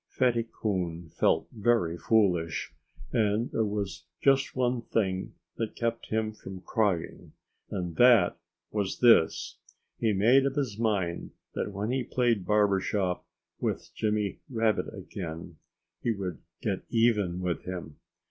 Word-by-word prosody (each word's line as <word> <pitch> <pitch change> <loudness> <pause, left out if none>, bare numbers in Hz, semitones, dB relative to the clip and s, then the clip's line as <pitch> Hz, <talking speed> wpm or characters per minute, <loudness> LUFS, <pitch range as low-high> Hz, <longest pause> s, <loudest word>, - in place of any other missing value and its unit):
Fatty 120 -3 +1
Coon 90 -5 -2
felt - - +2
very 110 -6 +1
foolish. 85 -7 +1 0.4
And 110 +1 +1
there 110 - +1
was 100 -5 -3
just 135 0 +3
one 125 -1 +1
thing 95 -5 -1 0.2
that 115 -2 -3
kept 115 0 -2
him 110 0 -1
from 95 -3 -9
crying. 100 -6 -1 0.4
And 90 -3 -3
THAT 120 -9 +6 0.4
was 100 -3 -1
THIS: 115 -10 +4 0.4
he 110 - +2
made 120 +7 +5
up 135 - -3
his 125 -8 -2
mind 100 -7 -1 0.2
that - - -2
when 100 +4 -2
he 130 0 0
played 120 -6 +1
barber 105 -2 +4
shop 95 -2 -1 0.3
with - - -3
Jimmy 105 -2 -1
Rabbit 115 -3 +1
again 90 -5 -7 0.4
he - - -1
would 100 -5 -2 0.2
get 100 -4 -1
even 105 -7 +2
with 90 -2 -2
him. 90 -4 -6
105 Hz, 135 wpm, -29 LUFS, 90-115 Hz, 0.4 s, THAT